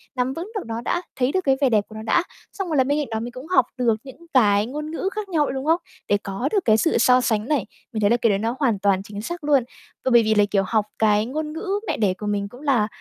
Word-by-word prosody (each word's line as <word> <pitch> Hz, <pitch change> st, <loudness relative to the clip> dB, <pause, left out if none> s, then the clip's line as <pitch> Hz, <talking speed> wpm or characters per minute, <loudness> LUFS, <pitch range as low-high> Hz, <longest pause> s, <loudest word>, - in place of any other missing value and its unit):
Nắm 255 Hz, +1 st, 0 dB
vững 350 Hz, +9 st, -6 dB
được 415 Hz, -, -2 dB
nó 230 Hz, +1 st, -4 dB
đã, 350 Hz, +8 st, -1 dB, 0.2 s
thấy 255 Hz, +2 st, +2 dB
được 375 Hz, -, +1 dB
cái 270 Hz, -, +4 dB
vẻ 275 Hz, -, +4 dB
đẹp 215 Hz, -3 st, +3 dB
của 220 Hz, -, -13 dB
nó 220 Hz, -, -6 dB
đã, 335 Hz, +10 st, +2 dB, 0.3 s
xong 390 Hz, -2 st, -4 dB
rồi 310 Hz, -, 0 dB
là 260 Hz, -, +5 dB
bên 285 Hz, +3 st, 0 dB
cạnh 290 Hz, -, -2 dB
đó 220 Hz, -, -1 dB
mình 240 Hz, +2 st, -5 dB
cũng 255 Hz, +4 st, -10 dB
học 320 Hz, -9 st, +4 dB
được 235 Hz, -3 st, +2 dB
những 275 Hz, +5 st, -13 dB
cái 210 Hz, -5 st, +4 dB
ngôn 300 Hz, +5 st, -5 dB
ngữ 375 Hz, +4 st, -2 dB
khác 420 Hz, -2 st, -4 dB
nhau 310 Hz, -4 st, +2 dB
nữa -, -, -3 dB
đúng 265 Hz, +1 st, -4 dB
hông? 330 Hz, +2 st, +3 dB, 0.3 s
Để 205 Hz, -, +4 dB
có 200 Hz, +8 st, -2 dB
được 400 Hz, -3 st, +1 dB
cái 220 Hz, -1 st, +5 dB
sự 325 Hz, +8 st, +2 dB
so 250 Hz, 0 st, +5 dB
sánh 220 Hz, -2 st, 0 dB
này. 285 Hz, -8 st, +1 dB, 0.3 s
Mình 215 Hz, -, -2 dB
thấy 205 Hz, -, +4 dB
là 240 Hz, -, +4 dB
cái 230 Hz, -1 st, +2 dB
đấy 195 Hz, -, +1 dB
nó 230 Hz, +3 st, -1 dB
hoàn 230 Hz, -8 st, +1 dB
toàn 195 Hz, -1 st, +2 dB
chính 205 Hz, 0 st, -7 dB
xác 340 Hz, +7 st, -6 dB
luôn. 285 Hz, -4 st, +3 dB, 0.4 s
Và 260 Hz, -, +2 dB
bởi 235 Hz, -1 st, +6 dB
vì 220 Hz, 0 st, +2 dB
là, 205 Hz, -1 st, +5 dB
kiểu, 195 Hz, -2 st, +2 dB
học 215 Hz, -1 st, +1 dB
cái 210 Hz, -1 st, +3 dB
ngôn 300 Hz, +5 st, -4 dB
ngữ 355 Hz, +5 st, -6 dB, 0.2 s
mẹ 315 Hz, -, -1 dB
đẻ 200 Hz, -4 st, +2 dB
của 210 Hz, -, -8 dB
mình 205 Hz, -1 st, -1 dB
cũng 245 Hz, +5 st, -13 dB
là 255 Hz, -8 st, +2 dB
250 Hz, 305 wpm, -23 LUFS, 215-300 Hz, 0.4 s, bởi